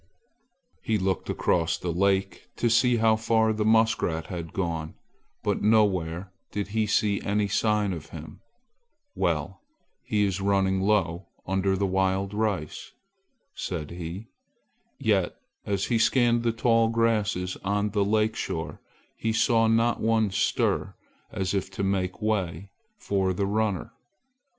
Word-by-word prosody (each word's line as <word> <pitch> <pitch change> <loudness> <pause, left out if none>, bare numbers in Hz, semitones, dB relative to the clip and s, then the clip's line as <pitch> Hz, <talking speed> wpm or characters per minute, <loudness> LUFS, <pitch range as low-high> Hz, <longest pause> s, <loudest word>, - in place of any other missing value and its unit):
He 110 - 0
looked 95 -1 -1
across 85 -2 +1
the 85 -2 -3
lake 95 +2 0
to 120 - +1
see 125 +1 +4
how 110 -1 +4
far 110 0 +2
the 105 0 -1
muskrat 110 -7 +2
had 85 -2 -5
gone, 80 -4 -3 0.5
but - - 0
nowhere 95 -5 +2 0.2
did 100 -1 -4
he 110 0 0
see 105 -1 +1
any 105 +1 0
sign 105 -1 +1
of 80 -4 -8
him. 80 -1 -10 0.7
"Well, - - -1 0.4
he 105 -1 +1
is 95 -1 -2
running 95 -1 +2
low 95 -3 +1 0.2
under 95 0 +1
the 100 - +1
wild 95 +1 0
rice!" 105 -7 -3 0.6
said 80 -4 -5
he. 85 +5 -7 0.7
Yet - - +1 0.3
as 100 -1 0
he 115 -2 +1
scanned 120 0 +3
the 115 0 +1
tall 115 0 +3
grasses 105 -5 0
on 105 +1 -1
the 100 -1 +1
lake 110 +2 +1
shore, 80 0 -4 0.4
he 110 - -1
saw 115 0 +3
not 115 +1 +2
one 110 -2 +2
stir 100 +1 0 0.4
as 95 -1 -2
if 95 -1 -1
to 100 - -3
make 95 0 -1
way 95 -3 -2 0.3
for 95 - 0
the 100 +2 -1
runner. 110 +1 -1
100 Hz, 140 wpm, -26 LUFS, 95-110 Hz, 0.7 s, see